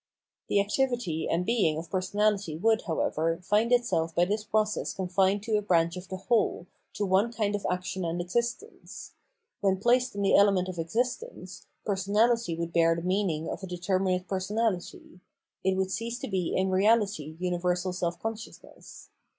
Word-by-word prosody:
The 200 - +2
activity 210 - 0
and 175 +2 0
being 195 -10 +2
of 165 +1 -7
personahty 195 -3 0
would, 220 +3 +3
however, 165 0 0
find 215 +5 +2
itself 165 -10 +1
by 175 - +4
this 210 +3 -1
process 215 0 -1
confined 190 +2 +1
to 215 -1 +1
a - - 0
branch 170 -4 +2
of 180 0 -8
the 190 - -5
whole, 210 -2 0 0.3
to 205 - -1
one 195 +5 +2
kind 215 -3 -1
of 205 - -2
action 180 +1 -3
and 170 +1 -2
existence; 235 - -4 0.5
when 195 -1 +2
placed 245 +3 +2
in 200 - -2
the 195 - +3
element 195 -2 +4
of 180 -2 -6
existence, 250 - -3 0.2
personahty 205 0 +1
would 170 0 -4
bear 165 0 +4
the 165 - -5
meaning 180 -4 0
of - - -5
a 190 - -6
determinate 185 +1 -1
personahty; 190 -2 -2 0.4
it 190 0 +2
would 190 0 0
cease 230 +3 -3
to - - -6
be 185 -4 -1
in 190 0 +1
reahty 195 -6 +1
universal 180 0 -1
self 175 -2 -2
consciousness. 225 0 -8
190 Hz, 165 wpm, -28 LUFS, 175-215 Hz, 0.5 s, by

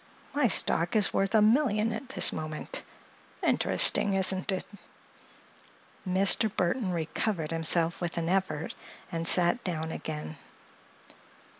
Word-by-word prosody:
My 285 -3 +2
stock 170 -2 +1
is 210 -2 +2
worth 195 +2 0
a 215 - +5
million 225 -2 +2
at 255 +3 -7
this - - +3
moment. 155 -1 -5 0.6
Interesting, 200 -1 +2
isn't 190 0 +2
it?" 185 - -3 1.4
Mr. 195 +4 +4
Burthon 185 +2 -1
recovered 165 0 -3
himself 165 +1 +1
with 170 -1 -4
an 165 -1 -2
effort 175 -4 -1 0.4
and 165 0 -3
sat 180 +7 +3
down 160 -3 -3
again. 155 -1 -6
185 Hz, 120 wpm, -28 LUFS, 165-210 Hz, 1.4 s, a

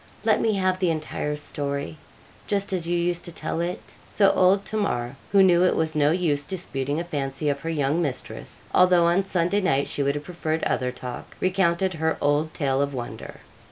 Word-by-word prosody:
Let 220 -2 +3
me 220 - +2
have 185 -2 +1
the 185 -2 +2
entire 155 -2 -2
story, 140 - -4 0.5
just 200 -1 -1
as 175 -3 -1
you 175 0 +1
used 175 0 -1
to 175 - -5
tell 165 - -3
it.' 175 +1 -5 0.2
So 195 -2 +4
old 195 +1 +3
Tamar, 125 - -2 0.2
who 195 -1 +6
knew 180 -1 +5
it 185 - +3
was 160 -1 0
no 150 -2 +3
use 155 -4 +1
disputing 145 -4 -3
a - - -2
fancy 145 -3 -2
of 140 -1 -1
her 165 - -5
young 150 +1 +1
mistress, 145 -6 -5
although 180 -2 +5
on 175 +3 +3
Sunday 185 +2 +1
night 140 -7 +1
she - - -3
would 140 +1 +1
have 145 - -4
preferred 160 -1 -3
other 125 0 0
talk, 125 0 -8
recounted 185 0 +1
her 160 0 0
old 145 +2 +1
tale 135 -3 0
of 140 -1 -1
wonder. 120 -2 -7
165 Hz, 195 wpm, -25 LUFS, 145-185 Hz, 0.5 s, who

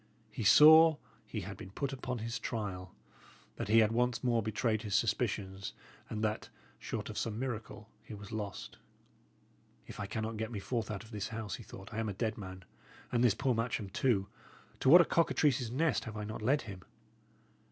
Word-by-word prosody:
He - - -4
saw 160 +7 +8 0.3
he - - -4
had - - -7
been 95 - -9
put 135 +8 -3
upon 130 -1 -4
his 115 +1 -4
trial, 95 -5 -5 0.6
that - - -3
he 110 +2 +4
had 110 -1 +5
once 120 0 0
more 120 -2 +2
betrayed 110 +1 0
his 105 -3 -2
suspicions, 100 -3 -1 0.4
and 110 0 -3
that, 110 0 -2 0.3
short - - -4
of - - -4
some 110 -2 -3
miracle, 115 -4 -5
he 110 - -9
was 105 0 -10
lost. 105 -3 -5 1.1
"If - - -10
I 100 - -3
cannot 110 +1 -3
get 110 +2 -3
me 110 - -4
forth 115 +1 -3
out 105 0 -4
of 115 - -15
this 105 -1 -3
house," 110 -4 -5
he 115 - -10
thought, 95 +1 -11
"I 110 - -3
am 110 -1 -1
a - - -3
dead 110 +3 -2
man! 95 -2 -9 0.5
And 120 0 +2
this 115 -4 +4
poor 135 +1 +1
Matcham, 115 -3 -2
too 105 -3 +1 0.5
to 130 - +2
what 175 +5 +10
a - - +3
cockatrice's 145 -7 +2
nest 135 -1 0
have 110 -1 -6
I 105 - -4
not 110 +1 -6
led 135 +7 +2
him!" 100 -4 -8
110 Hz, 195 wpm, -33 LUFS, 105-125 Hz, 1.1 s, what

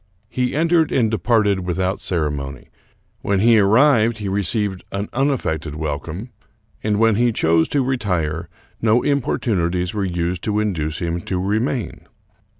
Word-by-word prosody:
He 125 +1 -1
entered 165 0 +2
and 115 -4 +2
departed 105 -1 +2
without 90 +1 -2
ceremony. 75 -5 -3 0.5
When 100 -1 0
he 115 +2 +5
arrived 115 +2 +4
he 105 - -5
received 100 0 -1
an 100 +1 -3
unaffected 85 - -1
wel 75 -2 -2
come, 85 - -7 0.5
and 105 -1 +1
when 115 -1 +3
he 120 0 +3
chose 80 -5 +2
to 140 -2 +1
retire 90 -10 -1 0.3
no 115 +2 +3
importunities 90 -10 0
were 105 -2 -1
used 90 -1 -2
to 105 -1 0
induce 80 -7 -2
him 85 0 -1
to 95 - -3
remain. 110 +5 -2
100 Hz, 145 wpm, -20 LUFS, 85-115 Hz, 0.5 s, he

